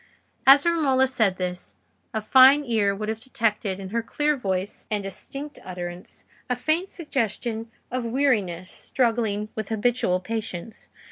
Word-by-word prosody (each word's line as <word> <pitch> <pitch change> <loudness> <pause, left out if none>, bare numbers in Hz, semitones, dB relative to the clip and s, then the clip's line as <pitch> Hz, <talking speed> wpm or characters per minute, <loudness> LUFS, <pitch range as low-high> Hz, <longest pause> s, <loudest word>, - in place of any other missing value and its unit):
As 280 +2 +8
Romola 285 -6 +3
said 220 -8 +1
this, 180 -1 -4 0.4
a 220 -1 -3
fine 265 +5 +7
ear 210 -5 +1
would 215 +1 -4
have 220 0 -2
detected 220 -5 -1
in 190 -1 -7
her 230 +3 -1
clear 295 +6 0
voice 195 -5 -3
and 210 -2 -1
distinct 275 +9 -7
utterance, 180 0 -8 0.2
a 250 - +1
faint 315 +9 0
suggestion 230 - -3 0.2
of 255 0 -2
weariness 215 -9 0
struggling 225 -4 -1
with 215 -2 -4
habitual 220 -4 +1
patience. 220 -1 -6
225 Hz, 140 wpm, -25 LUFS, 195-260 Hz, 0.4 s, As